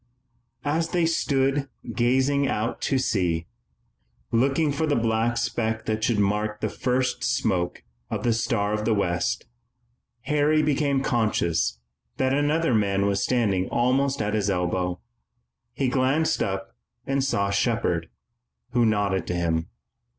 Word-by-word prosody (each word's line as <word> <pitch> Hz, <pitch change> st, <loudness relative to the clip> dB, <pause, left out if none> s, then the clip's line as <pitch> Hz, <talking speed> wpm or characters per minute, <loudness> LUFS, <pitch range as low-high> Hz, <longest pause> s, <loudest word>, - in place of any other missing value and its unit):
As 160 Hz, +3 st, 0 dB
they 175 Hz, -2 st, +1 dB
stood 135 Hz, -4 st, +1 dB, 0.3 s
there -, -, -7 dB
gazing 130 Hz, +3 st, +2 dB
out 110 Hz, 0 st, -2 dB
to 135 Hz, -, +1 dB
sea, 90 Hz, -9 st, 0 dB, 0.9 s
looking 135 Hz, +6 st, +2 dB
for 155 Hz, +3 st, -1 dB
the 145 Hz, -, +2 dB
black 115 Hz, +1 st, +1 dB
speck 110 Hz, -1 st, -1 dB
that 110 Hz, 0 st, -2 dB
should 115 Hz, -1 st, +2 dB
mark 105 Hz, +1 st, 0 dB
the 110 Hz, -, -1 dB
first 125 Hz, +1 st, -1 dB
smoke 110 Hz, -9 st, 0 dB, 0.3 s
of -, -, -3 dB
the 120 Hz, -, +2 dB
Star 110 Hz, -3 st, 0 dB
of 105 Hz, 0 st, -1 dB
the 110 Hz, 0 st, +2 dB
West, 100 Hz, +4 st, -1 dB, 0.8 s
Harry 150 Hz, +3 st, +2 dB
became 140 Hz, -2 st, +1 dB
conscious 105 Hz, -, +1 dB, 0.4 s
that 130 Hz, 0 st, +1 dB
another 145 Hz, +1 st, +2 dB
man 100 Hz, -2 st, +2 dB
was 100 Hz, -1 st, +1 dB
standing 100 Hz, -7 st, +1 dB
almost 130 Hz, +1 st, +1 dB
at 105 Hz, 0 st, -2 dB
his 105 Hz, -2 st, +1 dB
elbow. 90 Hz, -1 st, -1 dB, 0.7 s
He 135 Hz, -, -1 dB
glanced 140 Hz, +6 st, +1 dB
up 95 Hz, 0 st, -3 dB, 0.3 s
and 135 Hz, 0 st, 0 dB
saw 100 Hz, -7 st, 0 dB
Shepard, 100 Hz, -6 st, 0 dB, 0.6 s
who 120 Hz, -2 st, +3 dB
nodded 100 Hz, -4 st, 0 dB
to 90 Hz, -, -2 dB
him. 80 Hz, -1 st, 0 dB
115 Hz, 140 wpm, -25 LUFS, 100-135 Hz, 0.9 s, who